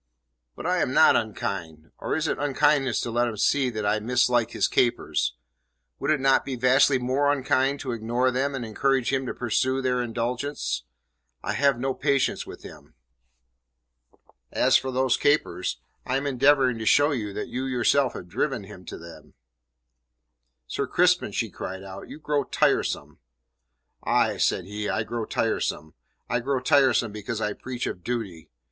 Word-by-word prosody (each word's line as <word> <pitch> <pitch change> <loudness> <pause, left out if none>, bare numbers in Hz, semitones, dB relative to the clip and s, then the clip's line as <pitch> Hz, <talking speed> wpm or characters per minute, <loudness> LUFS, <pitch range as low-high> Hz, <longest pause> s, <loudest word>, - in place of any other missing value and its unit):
"But - - -8
I - - +1
am - - 0
not - - +6
unkind. 80 -1 -3
Or - - -2
is 160 0 -1
it - - -2
unkindness 145 -3 +2
to 120 - -4
let 120 +1 +1
him 110 -2 -5
see 135 +5 +2
that 110 -3 -4
I 105 +1 +2
mislike 120 +1 +2
his - - 0
capers? 120 -1 0 0.6
Would - - -2
it 155 -2 +3
not 135 0 +3
be 135 - -4
vastly 130 +2 +4
more 130 +3 +1
unkind 135 0 +1
to 130 - -4
ignore 120 +3 0
them 135 +2 -1
and 120 -3 -4
encourage 130 +3 0
him 130 -1 0
to - - -3
pursue 130 +2 0
their 125 -1 0
indulgence? 120 - -3 0.6
I - - -2
have 140 -3 +2
no 135 +1 -1
patience 140 0 0
with - - -10
him." - - -13 1.6
"As - - +3
for 130 - +2
those 130 -1 +1
capers, 145 -10 0 0.2
I 130 - -1
am 135 - -3
endeavouring 135 -2 +3
to 110 - -4
show 145 +1 +5
you 110 -7 -3
that 105 - -5
you 130 +1 -3
yourself 130 +1 +2
have 90 - -8
driven 130 +5 -2
him 95 -2 -12
to - - -7
them." 85 0 -13 1.3
"Sir - - -3
Crispin," - - +2
she - - -2
cried 95 +1 -6
out, 95 0 -9
"you - - -8
grow 150 -2 -1
tiresome." - - 0 0.8
"Aye," - - +2
said 90 - +1
he, 105 +1 -4
"I 110 - 0
grow 115 0 -4
tiresome. 80 -6 -2 0.3
I 120 - 0
grow 135 +2 -1
tiresome 130 -5 +3
because 105 +2 -5
I 105 -1 -1
preach 125 -1 -5
of 90 - -5
duty. 100 -10 -4
125 Hz, 170 wpm, -25 LUFS, 110-135 Hz, 1.6 s, not